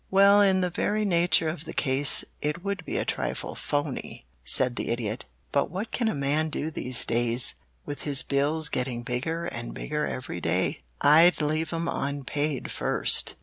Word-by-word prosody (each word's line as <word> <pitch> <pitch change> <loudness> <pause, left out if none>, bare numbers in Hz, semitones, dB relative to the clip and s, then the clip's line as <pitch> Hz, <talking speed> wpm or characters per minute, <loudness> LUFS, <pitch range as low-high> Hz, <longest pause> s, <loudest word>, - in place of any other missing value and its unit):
"Well, 200 +1 +6
in 190 -2 +3
the 180 -1 -1
very 210 +4 0
nature 170 -3 +3
of 155 0 -4
the - - -8
case 135 0 +3 0.2
it 150 +4 -2
would 200 -3 -3
be - - -3
a - - -1
trifle 60 +1 -3
'phoney'," 145 - -4 0.2
said 125 - +4
the - - -4
Idiot, 115 -1 -3 0.3
"but 140 - +1
what 200 +5 -5
can 235 - -1
a 220 - 0
man 145 +3 0
do 155 +1 -3
these 125 -4 -1
days, 120 +1 +2 0.3
with 145 -1 -6
his 140 -3 +1
bills 150 +3 +1
getting 125 -3 -3
bigger 150 +8 -3
and 120 -9 -6
bigger 150 0 -2
every 130 - -5
day?" - - 0 0.2
"I'd 165 +5 +6
leave 155 +1 -1
'em 165 0 -2
unpaid 145 0 -2
first!" - - +1
150 Hz, 175 wpm, -26 LUFS, 130-170 Hz, 0.3 s, Well